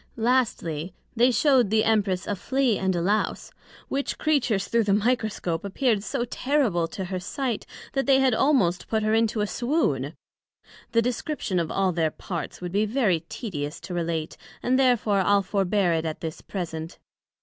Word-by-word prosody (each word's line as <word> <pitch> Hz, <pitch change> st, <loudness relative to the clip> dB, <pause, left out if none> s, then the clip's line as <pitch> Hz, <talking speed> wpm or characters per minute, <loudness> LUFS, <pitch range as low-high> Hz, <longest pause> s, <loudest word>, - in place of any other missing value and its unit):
Lastly, 220 Hz, -, 0 dB, 0.2 s
They 240 Hz, +2 st, +5 dB
shewed 255 Hz, -2 st, +3 dB
the 215 Hz, +1 st, +3 dB
Empress 200 Hz, -4 st, +1 dB
a 205 Hz, -, -1 dB
Flea, 255 Hz, +3 st, +1 dB
and 190 Hz, -1 st, 0 dB
a 170 Hz, -, 0 dB
Lowse; 205 Hz, +4 st, 0 dB, 0.4 s
which 275 Hz, +1 st, -2 dB
Creatures 240 Hz, -10 st, +1 dB
through 230 Hz, -2 st, +2 dB
the 200 Hz, -1 st, +3 dB
Microscope 215 Hz, -7 st, 0 dB
appear'd 210 Hz, +1 st, 0 dB
so 240 Hz, -, -2 dB
terrible 245 Hz, -, +1 dB
to 190 Hz, +3 st, -5 dB
her 185 Hz, 0 st, -3 dB
sight, 250 Hz, +4 st, -3 dB, 0.3 s
that 270 Hz, 0 st, 0 dB
they 270 Hz, -1 st, +5 dB
had 265 Hz, -2 st, +3 dB
almost 220 Hz, -, +2 dB
put 220 Hz, -1 st, 0 dB
her 215 Hz, 0 st, +1 dB
into 225 Hz, -1 st, +2 dB
a -, -, +2 dB
swoon; 200 Hz, -, -1 dB, 0.8 s
the 230 Hz, 0 st, +3 dB
description 245 Hz, -, -2 dB
of 165 Hz, -2 st, -1 dB
all 195 Hz, -1 st, +1 dB
their 165 Hz, -2 st, +1 dB
parts 170 Hz, +2 st, -6 dB
would 180 Hz, -1 st, -4 dB
be 205 Hz, +3 st, +2 dB
very 210 Hz, -7 st, +2 dB
tedious 165 Hz, -, -5 dB
to 170 Hz, +2 st, -7 dB
relate, 165 Hz, -2 st, -2 dB, 0.3 s
and 255 Hz, +2 st, +2 dB
therefore 240 Hz, -6 st, +3 dB
I'le 200 Hz, +1 st, +3 dB
forbear 195 Hz, -2 st, +1 dB
it 165 Hz, 0 st, -1 dB
at 160 Hz, -1 st, -4 dB
this 160 Hz, -1 st, -5 dB
present. 165 Hz, -3 st, -5 dB
205 Hz, 170 wpm, -25 LUFS, 175-245 Hz, 0.8 s, They